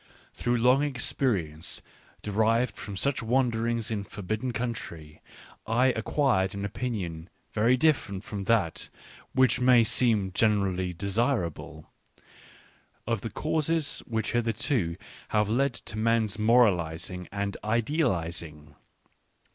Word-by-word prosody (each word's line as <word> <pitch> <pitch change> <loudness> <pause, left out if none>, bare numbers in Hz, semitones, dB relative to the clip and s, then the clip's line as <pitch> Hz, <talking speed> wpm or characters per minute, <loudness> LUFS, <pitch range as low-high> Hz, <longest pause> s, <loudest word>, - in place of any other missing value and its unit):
/ - - -31
Through 120 0 0
long 125 +4 +4
experience, 115 - -1 0.4
de 105 - -3
rived 115 +4 +2
from 100 -2 -7
such 140 +5 0
wanderings 115 -2 0
in 105 -2 -2
forbidden 110 +5 -4
country, 85 -11 -5 0.5
I 125 +4 +3
acquired 110 -5 +1
an 100 0 -3
opinion 95 -8 -4 0.2
very 115 +4 +3
different 125 -10 +1
from 100 -2 -5
that 100 -8 +1 0.4
which 130 0 +4
may 125 -2 +6
seem 110 -4 +2
generally 95 -4 +1
desirable, 100 - -2 1.2
of 115 -3 -1
the 115 - -4
causes 155 +1 0
which 110 -2 -1
hitherto 115 - 0 0.3
have 105 -1 +1
led 130 +2 +1
to 110 -2 -6
men's 110 -2 +1
moralising 90 -6 +2
and 100 0 -2
idealising. 85 - -1
110 Hz, 115 wpm, -28 LUFS, 95-125 Hz, 1.2 s, may